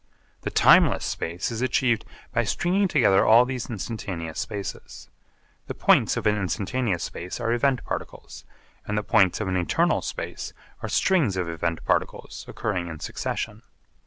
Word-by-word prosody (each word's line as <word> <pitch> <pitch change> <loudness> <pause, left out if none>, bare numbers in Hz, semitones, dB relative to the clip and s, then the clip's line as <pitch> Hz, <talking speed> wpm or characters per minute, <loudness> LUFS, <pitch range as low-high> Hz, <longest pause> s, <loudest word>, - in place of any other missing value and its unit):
The - - -3
timeless - - +5
space 85 +7 -3
is 115 0 -4
achieved 120 -3 +1 0.3
by 120 - +2
stringing 185 - +1
together 120 - +4
all 115 +3 +6
these 125 -1 -4
instantaneous 95 -7 -5
spaces. 100 -3 -6 0.6
The - - -5
points - - +3
of - - -3
an 105 0 +3
instantaneous 100 +1 -1
space 90 +6 -6
are 115 -1 0
event 130 +1 +1
particles, - - -6 0.4
and 105 - -1
the 105 - 0
points 100 -5 +3
of 110 - -2
an 95 0 0
eternal 90 -2 +1
space - - -5 0.3
are - - -4
strings 150 - +2
of 90 -2 -1
event 85 0 -3
particles - - -2
occurring 90 -5 -3
in 80 -2 -7
succession. 105 +6 -4
105 Hz, 155 wpm, -25 LUFS, 90-120 Hz, 0.6 s, all